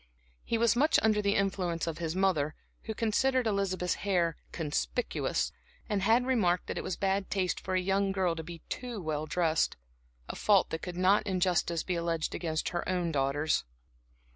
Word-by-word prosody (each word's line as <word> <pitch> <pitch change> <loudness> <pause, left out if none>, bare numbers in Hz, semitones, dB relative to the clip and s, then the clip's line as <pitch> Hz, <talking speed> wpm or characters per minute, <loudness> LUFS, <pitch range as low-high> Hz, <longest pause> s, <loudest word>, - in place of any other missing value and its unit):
He 230 - 0
was 230 -1 +3
much 300 +6 +4
under 215 -1 +3
the 200 0 +1
influence 185 -4 0
of 165 -1 -4
his 165 0 -2
mother, 170 -6 +1 0.3
who 220 - -4
considered 250 +4 +1
Elizabeth's 195 -4 0
hair 175 -5 +1 0.2
"conspicuous" 165 +9 -1 0.4
and 205 -2 0
had 225 +5 +3
remarked 200 -9 +2
that - - -4
it - - -5
was 185 - -2
bad 195 0 0
taste 185 -2 0
for 185 - -3
a - - +3
young 195 +1 +1
girl 185 -3 +1
to 165 - -4
be 165 0 -9
too 245 -4 -5
well 155 -3 -3
dressed 165 -2 +1 0.5
a - - -5
fault 200 -3 +3
that 160 - -3
could 180 -1 -6
not 190 +4 +3
in 190 -2 0
justice 175 -2 +1
be 180 - -2
alleged 170 -2 -1
against 160 -2 -2
her 175 -1 -2
own 180 -2 0
daughters. 145 +2 +1
185 Hz, 185 wpm, -30 LUFS, 165-200 Hz, 0.5 s, much